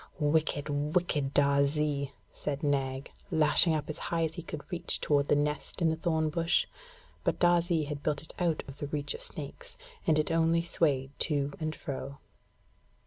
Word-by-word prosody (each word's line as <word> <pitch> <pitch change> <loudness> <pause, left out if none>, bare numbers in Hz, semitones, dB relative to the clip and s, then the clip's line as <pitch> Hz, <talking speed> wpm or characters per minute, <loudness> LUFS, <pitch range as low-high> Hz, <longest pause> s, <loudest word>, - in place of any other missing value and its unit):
'Wicked, 150 -1 +1 0.3
wicked 150 -6 +1
Darzee!' 140 0 +2 0.2
said 145 +1 -3
Nag, 135 -1 0 0.2
lashing 160 0 +4
up 150 -2 -2
as 155 +1 -4
high 165 -1 +1
as 160 -1 -1
he 175 - -5
could 155 -2 -7
reach 170 -1 -2
toward 145 -1 +2
the - - +4
nest 150 0 -1
in 165 -2 +3
the 160 - +1
thorn 160 -1 0
bush; 165 +1 +2 0.6
but - - +1
Darzee 175 -2 +3
had 145 -1 -4
built 150 0 -1
it 160 - -9
out 170 -4 +1
of 135 - -10
reach 145 -1 -1
of - - -7
snakes, - - -6 0.3
and 155 -2 +5
it 155 - +1
only 165 0 +3
swayed 140 -6 +1
to 145 -3 0
and 155 -1 -2
fro. 140 0 -5
150 Hz, 170 wpm, -30 LUFS, 145-165 Hz, 0.6 s, and